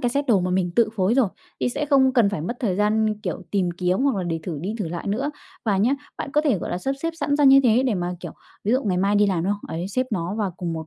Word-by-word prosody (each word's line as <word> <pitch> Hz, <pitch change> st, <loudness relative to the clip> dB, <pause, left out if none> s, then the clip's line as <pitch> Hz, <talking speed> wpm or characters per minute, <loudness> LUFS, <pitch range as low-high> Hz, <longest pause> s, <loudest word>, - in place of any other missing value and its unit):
cái 245 Hz, -, +1 dB
set 280 Hz, +3 st, -1 dB
đồ 215 Hz, -6 st, +4 dB
mà 180 Hz, 0 st, -1 dB
mình 180 Hz, -1 st, +1 dB
tự 230 Hz, -2 st, +4 dB
phối 190 Hz, +4 st, +2 dB
rồi 255 Hz, -5 st, +3 dB, 0.3 s
thì -, -, +1 dB
sẽ 290 Hz, +4 st, -2 dB
không 265 Hz, -2 st, +4 dB
cần 235 Hz, -6 st, +4 dB
phải 200 Hz, -, -3 dB
mất 235 Hz, +10 st, -4 dB
thời 195 Hz, -7 st, 0 dB
gian, 215 Hz, +1 st, +1 dB
kiểu, -, -, -4 dB
tìm 185 Hz, -3 st, +1 dB
kiếm 180 Hz, +1 st, 0 dB
hoặc 270 Hz, -4 st, +2 dB
là 190 Hz, -, -1 dB
để 165 Hz, -2 st, -2 dB
thử 160 Hz, -5 st, -4 dB
đi 200 Hz, +6 st, -3 dB
thử 195 Hz, -6 st, -2 dB
lại 170 Hz, +4 st, -5 dB
nữa. 260 Hz, +9 st, -1 dB, 0.3 s
Và 210 Hz, -4 st, +2 dB
nhá, 210 Hz, +6 st, +3 dB, 0.3 s
bạn -, -, -4 dB
có 300 Hz, -, +4 dB
thể, 280 Hz, -, +1 dB
gọi -, -, -5 dB
là, 175 Hz, -, -2 dB
sắp 270 Hz, +9 st, -2 dB
xếp 330 Hz, -, 0 dB
sẵn 285 Hz, -, +1 dB
ra 295 Hz, -, +3 dB
như 270 Hz, 0 st, +8 dB
thế 240 Hz, +1 st, +4 dB
để 250 Hz, -5 st, +1 dB
mà, 175 Hz, 0 st, -2 dB
kiểu, -, -, -7 dB, 0.3 s
ví 215 Hz, -, +1 dB
dụ 260 Hz, +2 st, +2 dB
ngày 185 Hz, -3 st, 0 dB
mai 195 Hz, +2 st, +2 dB
đi 205 Hz, 0 st, +4 dB
làm, 180 Hz, -4 st, 0 dB
đúng 200 Hz, -, +1 dB
không? 205 Hz, -, -7 dB
Ấy, 175 Hz, +3 st, -3 dB
xếp 255 Hz, +6 st, -1 dB
nó 180 Hz, -1 st, -2 dB
vào 210 Hz, -3 st, -1 dB
cùng 170 Hz, -2 st, -3 dB
một 160 Hz, -1 st, -5 dB
205 Hz, 315 wpm, -23 LUFS, 180-255 Hz, 0.3 s, như